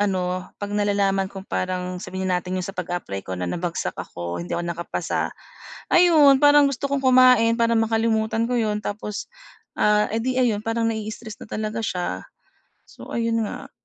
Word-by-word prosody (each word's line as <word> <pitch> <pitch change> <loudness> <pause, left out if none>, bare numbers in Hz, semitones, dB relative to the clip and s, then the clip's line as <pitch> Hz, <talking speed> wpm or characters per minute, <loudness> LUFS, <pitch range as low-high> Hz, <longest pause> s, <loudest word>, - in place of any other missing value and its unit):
ano, 185 -2 -1
'pag 205 0 -5
nalalaman 200 -2 +1
kung 195 -1 -9
parang 180 -1 -3
sabihin 190 0 -4
na 180 - +2
nating 185 +1 -4
'yong 180 - -2
sa 195 - -5
pag-a-apply 175 - -4
ko 95 -1 -4
na 90 - -3
nabagsak 170 - -3
ako, 85 0 -5
hindi 85 - -4
ako 175 - -2
nakapasa, 170 0 -2 0.6
ayun 315 -6 +6
parang 290 -1 +7
gusto 275 +1 -3
kong 280 - 0
kumain 255 -3 +6
para 230 -1 +2
makalimutan 225 0 +1
ko 245 +1 -1
'yon, 210 -1 -1
tapos, 210 0 -5 0.5
ah, 210 0 +4
eh 225 - 0
di 255 +2 -1
ayun 230 -5 +2
parang 225 +1 -1
nai-stress 220 0 -6
na - - -9
talaga 215 +1 -3
siya, 180 -4 -3 0.6
so - - -13
ayun 230 -1 0
nga. - - -8
210 Hz, 175 wpm, -23 LUFS, 185-230 Hz, 0.6 s, parang